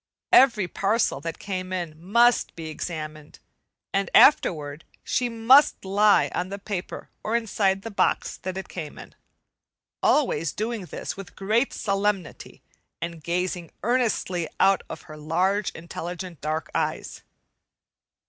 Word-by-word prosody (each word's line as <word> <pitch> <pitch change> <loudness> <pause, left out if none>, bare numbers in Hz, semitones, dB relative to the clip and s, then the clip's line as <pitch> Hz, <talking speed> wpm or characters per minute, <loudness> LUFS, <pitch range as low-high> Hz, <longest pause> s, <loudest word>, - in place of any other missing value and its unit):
Every 235 -8 +6
parcel 200 - 0
that 165 +2 -5
came 185 -2 -5
in 175 -4 -3
must 235 +7 +3
be 160 -1 -6
examined, 155 -1 -6 0.6
and 195 -1 0
afterward 150 - +4 0.2
she 245 -1 0
must 235 +2 +5
lie 205 +2 +4
on 180 +1 -2
the 200 - -5
paper 200 -2 -6
or 220 - -1
inside 195 -4 +1
the 225 - -6
box 200 - 0
that 185 0 -5
it 190 - -5
came 155 -5 -7
in, - - -11 0.9
always 165 - +2
doing 220 -2 -3
this - - -6
with 195 -2 -10
great 220 +7 +1
solemnity 200 -3 -2 0.4
and 170 -2 -6
gazing 175 -1 -2
earnestly 215 -8 0
out 195 0 +4
of - - -8
her 155 -1 -11
large, 185 +7 0
intelligent 170 +1 -7
dark 155 +1 -3
eyes. - - -2
190 Hz, 130 wpm, -25 LUFS, 170-210 Hz, 0.9 s, Every